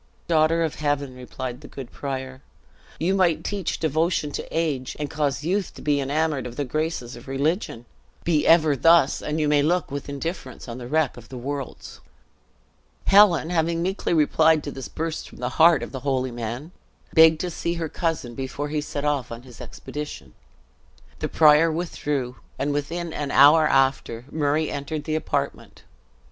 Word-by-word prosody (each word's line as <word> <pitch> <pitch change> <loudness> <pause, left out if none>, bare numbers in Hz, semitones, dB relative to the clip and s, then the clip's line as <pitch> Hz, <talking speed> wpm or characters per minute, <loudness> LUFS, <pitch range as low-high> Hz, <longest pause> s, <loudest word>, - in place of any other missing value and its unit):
"Daughter 165 0 +3
of 160 - -1
heaven," 145 -3 -1
replied 125 0 -6
the 145 - -11
good 130 -3 -9
prior, 130 -1 -5 0.6
"you 175 +4 +1
might 180 -4 +2
teach 200 -4 -2
devotion 160 0 0
to - - -5
age, 150 -6 -2
and 150 -1 -4
cause 145 -2 -1
youth 185 +3 -1
to - - -10
be 145 -1 +2
enamored 145 -1 -1
of 120 - -9
the 145 - -2
graces 155 -3 -3
of 120 +2 -13
religion! 135 - -1 0.4
Be 155 -3 +1
ever 160 -3 +5
thus, 165 0 +4
and 150 +1 -2
you 150 - +1
may 145 -1 +4
look 170 +1 0
with 140 0 -5
indifference 140 -2 -6
on 120 +1 -6
the 120 - -7
wreck 155 -1 0
of 115 +1 -13
worlds." 135 +2 -6 1.0
Helen 195 -5 +5
having 165 0 +1
meekly 190 +3 -2
replied 160 0 +4
to 145 - -5
this 135 -2 -7
burst 165 0 -4
from - - -15
the 125 0 -2
heart 165 -1 +6
of - - -7
the 130 - -5
holy 130 -1 -1
man, 120 +7 -5 0.4
begged 160 -1 +7
to 180 - -3
see 170 +1 -2
her 165 -1 -3
cousin 160 -7 -2
before 135 +3 -4
he 150 0 -1
set 145 0 -4
off 145 -5 -1
on 115 +1 -7
his 125 -3 -13
expedition. 145 - -8 0.9
The - - -2
prior 155 +1 +5
withdrew, 145 -6 -3 0.2
and 145 +1 -1
within 165 +3 -3
an 145 -1 -3
hour 150 +3 +7
after, 135 -4 +1
Murray 150 0 0
entered 145 +1 -4
the 155 - -3
apartment. 155 - -3
150 Hz, 175 wpm, -24 LUFS, 135-160 Hz, 1.0 s, begged